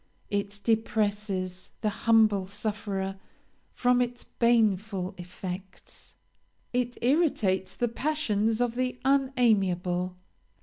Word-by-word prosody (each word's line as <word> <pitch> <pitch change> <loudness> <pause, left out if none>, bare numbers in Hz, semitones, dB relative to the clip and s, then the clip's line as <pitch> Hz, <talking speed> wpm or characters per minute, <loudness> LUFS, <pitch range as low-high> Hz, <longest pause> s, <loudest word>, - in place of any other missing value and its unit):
It 205 0 -2
depresses 205 -4 0
the 215 - +1 0.2
humble 215 -4 +5
sufferer 200 -2 -3 0.5
from 250 0 +2
its 245 0 -2
baneful 210 -5 +1
effects; 185 +1 -8 0.6
it 245 -1 -1
irritates 215 - +2
the 240 - 0
passions 225 -5 0
of 245 -1 +1
the 250 0 -2
unamiable. 195 -10 +2
210 Hz, 90 wpm, -28 LUFS, 190-240 Hz, 0.6 s, humble